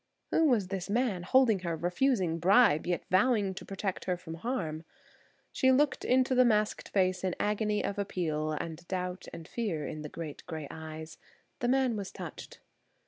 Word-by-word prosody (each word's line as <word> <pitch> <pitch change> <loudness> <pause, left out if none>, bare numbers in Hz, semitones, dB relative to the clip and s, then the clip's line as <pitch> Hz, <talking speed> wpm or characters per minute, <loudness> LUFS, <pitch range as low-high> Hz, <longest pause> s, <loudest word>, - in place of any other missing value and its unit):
Who 325 - +4
was 225 -10 +2
this 195 0 -4
man 220 -4 +1
holding 225 +2 +4
her, 170 -2 -2
refusing 180 - +1
bribe, 190 -2 +5
yet 175 -1 0
vowing 200 0 +3
to - - -8
protect 195 -1 -4
her 180 -1 0
from 175 -2 -8
harm. 165 -5 -3 0.7
She 260 - +3
looked 285 +2 +2
into 260 +1 +3
the 255 0 +6
masked 215 -3 +1
face 185 -2 +1
in 185 -2 0
an - - -6
agony 210 0 0
of 200 0 -2
appeal 155 -6 -1
and 165 +2 -5
doubt 180 0 -3
and 165 - -9
fear 190 -11 -2
in 155 - -5
the 150 - -6
great 155 -2 -7
grey 155 -3 -5
eyes. 160 0 -8 0.4
The 245 - 0
man 260 -2 +2
was 200 -2 -5
touched. - - -9
190 Hz, 180 wpm, -30 LUFS, 165-230 Hz, 0.7 s, the